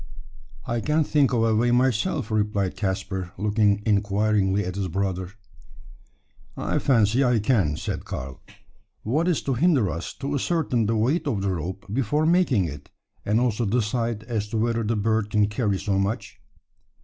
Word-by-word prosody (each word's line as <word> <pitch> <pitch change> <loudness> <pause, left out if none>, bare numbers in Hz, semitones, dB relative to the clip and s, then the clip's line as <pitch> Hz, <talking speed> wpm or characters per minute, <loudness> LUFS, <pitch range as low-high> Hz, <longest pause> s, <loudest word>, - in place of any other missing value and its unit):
"I 120 0 -2
can't 150 +3 +1
think 145 -2 +2
of 115 -2 +2
a 110 -1 +2
way 120 +3 +2
myself," 125 - +1
replied 105 -3 0
Caspar, 95 -2 -3
looking 105 0 +1
inquiringly 105 -1 +1
at 90 - -3
his 100 0 -2
brother. 95 0 -3 1.2
"I - - -1
fancy 120 0 +3
I 125 -2 +3
can," 100 - +1
said - - -4
Karl. 65 +1 -7 0.6
"What 150 +10 0
is 175 -4 +1
to 135 - 0
hinder 130 - +2
us 85 - -5
to 140 +1 -4
ascertain 140 -6 0
the 115 - +1
weight 140 +9 +1
of 105 -8 -1
the 100 - 0
rope 95 +4 -5
before 135 +5 +1
making 160 - +3
it, 75 -2 -8 0.4
and 105 +3 +3
also 120 -2 0
decide 115 0 -1
as 110 -3 -3
to 110 - -3
whether 115 +1 0
the 115 +1 -1
bird 110 0 0
can 105 -1 +3
carry 105 -1 -1
so 95 0 -1
much?" 100 +4 -3
110 Hz, 165 wpm, -24 LUFS, 100-125 Hz, 1.2 s, fancy